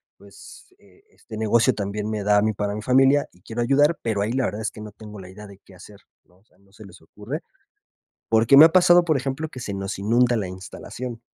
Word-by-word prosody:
pues 370 Hz, -, -16 dB
este 400 Hz, -, -16 dB
negocio 115 Hz, +3 st, +2 dB
también 105 Hz, +1 st, -4 dB
me 105 Hz, -2 st, -3 dB
da 105 Hz, 0 st, +3 dB
a -, -, +3 dB
mí 110 Hz, +1 st, 0 dB
para 100 Hz, 0 st, -3 dB
mi 105 Hz, -, -5 dB
familia 135 Hz, +4 st, +3 dB
y 90 Hz, -, -25 dB
quiero 115 Hz, +4 st, -5 dB
ayudar, 145 Hz, +6 st, +2 dB
pero 110 Hz, -4 st, -2 dB
ahí 105 Hz, +2 st, -1 dB
la 130 Hz, +1 st, -1 dB
verdad 105 Hz, -, -4 dB
es 110 Hz, -, -3 dB
que -, -, -13 dB
no 105 Hz, -1 st, -10 dB
tengo 105 Hz, -1 st, -12 dB
la 95 Hz, -, -11 dB
idea 105 Hz, +3 st, -12 dB
de 100 Hz, -1 st, -14 dB
qué 95 Hz, -1 st, -20 dB
hacer", 100 Hz, +3 st, -15 dB, 0.2 s
¿no? 90 Hz, -, -29 dB
O 95 Hz, -, -32 dB
sea, -, -, -33 dB
no 100 Hz, 0 st, -28 dB
se 110 Hz, +1 st, -15 dB
les 95 Hz, 0 st, -16 dB
ocurre. 105 Hz, -, -8 dB, 0.9 s
Porque 115 Hz, +4 st, +4 dB
me 145 Hz, -, +10 dB
ha 160 Hz, -, +8 dB
pasado, 175 Hz, 0 st, +5 dB
por 160 Hz, -4 st, +1 dB
ejemplo, 135 Hz, +4 st, -4 dB
que 130 Hz, -, -10 dB
se 105 Hz, -4 st, -6 dB
nos 95 Hz, +1 st, -5 dB
inunda 120 Hz, +4 st, +2 dB
la 100 Hz, -4 st, -3 dB
instalación. 115 Hz, +6 st, -9 dB
110 Hz, 245 wpm, -22 LUFS, 100-130 Hz, 0.9 s, me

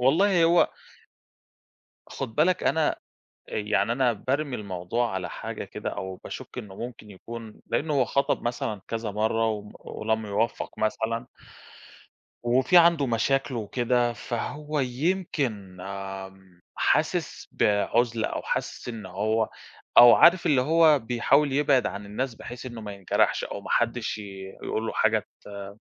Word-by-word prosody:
والله 170 Hz, +7 st, +4 dB
هو 170 Hz, +1 st, +5 dB, 1.4 s
خُد 110 Hz, -, -5 dB
بالك 175 Hz, +4 st, +2 dB
أنا 160 Hz, -2 st, +3 dB
أ -, -, -9 dB, 0.5 s
يعني 105 Hz, +2 st, 0 dB
أنا 125 Hz, 0 st, +2 dB
بارمي 135 Hz, +5 st, -2 dB
الموضوع 100 Hz, +3 st, -2 dB
على 90 Hz, -2 st, -3 dB
حاجة -, -, -6 dB
كده، -, -, -5 dB
أو 95 Hz, 0 st, -5 dB
باشُكّ -, -, -8 dB
إنه 100 Hz, -2 st, -7 dB
ممكن 115 Hz, -1 st, -8 dB
يكون 115 Hz, +3 st, -10 dB
لأنه 155 Hz, 0 st, 0 dB
هو 135 Hz, -3 st, +3 dB
خَطَب 140 Hz, +3 st, 0 dB
مثلًا 115 Hz, -4 st, -2 dB
كذا 115 Hz, -2 st, -3 dB
مرّه 110 Hz, +2 st, +1 dB
وم 105 Hz, -1 st, -4 dB
ولم 110 Hz, 0 st, -2 dB
يوفّق 105 Hz, +3 st, -2 dB
مثلًا 115 Hz, +2 st, -1 dB, 1.2 s
وفي 130 Hz, +7 st, +3 dB
عنده 170 Hz, -4 st, +6 dB
مشاكلُه 130 Hz, +2 st, 0 dB
وكده، 120 Hz, +2 st, +1 dB
فهو 150 Hz, +6 st, -3 dB
يمكن 130 Hz, -, -2 dB, 1.0 s
حاسس -, -, 0 dB
بعُزلة 115 Hz, +2 st, +1 dB
أو -, -, -4 dB
حاسس -, -, -3 dB
إن 110 Hz, -5 st, -6 dB
هو 110 Hz, +4 st, 0 dB, 0.5 s
أو 120 Hz, -1 st, +11 dB
عارف 175 Hz, +1 st, +6 dB
اللي 140 Hz, -4 st, +4 dB
هو 155 Hz, +2 st, +5 dB
بيحاول 135 Hz, +4 st, +2 dB
يبعد 140 Hz, -2 st, +3 dB
عن 100 Hz, 0 st, -5 dB
الناس 120 Hz, +5 st, -3 dB
بحيث 120 Hz, +3 st, -9 dB
إنه 120 Hz, -2 st, -7 dB
ما 105 Hz, -2 st, -6 dB
ينجرحش 100 Hz, -2 st, +1 dB
أو -, -, -6 dB
ما -, -, -9 dB
حدش 120 Hz, -1 st, 0 dB
ي -, -, -6 dB, 0.4 s
يقول 110 Hz, -, -2 dB
له -, -, -2 dB
حاجة -, -, +2 dB, 0.3 s
ت 100 Hz, +2 st, -9 dB
120 Hz, 140 wpm, -26 LUFS, 110-140 Hz, 1.4 s, أو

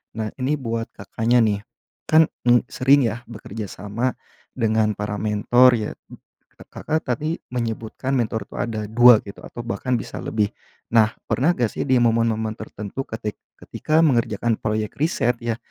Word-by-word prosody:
Nah 110 Hz, -1 st, -2 dB
ini 135 Hz, +4 st, +1 dB
buat 115 Hz, -4 st, -3 dB
Kakaknya 115 Hz, +5 st, +1 dB
nih, 105 Hz, -2 st, +1 dB, 0.5 s
kan, 160 Hz, 0 st, +5 dB, 0.2 s
mmm, 120 Hz, 0 st, +5 dB
sering 140 Hz, +2 st, +4 dB
ya 120 Hz, +1 st, -2 dB
bekerja 110 Hz, -1 st, -7 dB
sama 105 Hz, +7 st, -3 dB, 0.4 s
dengan 110 Hz, -2 st, +1 dB
para 105 Hz, 0 st, -3 dB
mentor 115 Hz, +4 st, +4 dB
ya, 110 Hz, -2 st, -2 dB, 0.8 s
Kakak 155 Hz, +1 st, -2 dB
tadi 155 Hz, +7 st, -2 dB
menyebutkan 115 Hz, +2 st, -3 dB
mentor 110 Hz, -4 st, -1 dB
tuh -, -, -6 dB
ada 110 Hz, -2 st, -3 dB
2 120 Hz, +2 st, +7 dB
gitu, 100 Hz, -, -10 dB
atau 120 Hz, -, -8 dB
bahkan 125 Hz, +1 st, -1 dB
bisa 110 Hz, -, -6 dB
lebih, 105 Hz, -2 st, -1 dB, 0.4 s
nah 110 Hz, -1 st, +5 dB
pernah 135 Hz, +7 st, +1 dB
gak 125 Hz, -, +2 dB
sih -, -, -3 dB
di 130 Hz, -, +5 dB
momen-momen 115 Hz, -2 st, +1 dB
tertentu 105 Hz, +3 st, -6 dB
ketik 110 Hz, -2 st, -4 dB, 0.2 s
ketika 155 Hz, +1 st, -1 dB
mengerjakan 115 Hz, -4 st, +1 dB
proyek 110 Hz, -1 st, -2 dB
riset 150 Hz, -6 st, +2 dB
ya, 115 Hz, -1 st, -2 dB
115 Hz, 155 wpm, -22 LUFS, 110-125 Hz, 0.8 s, 2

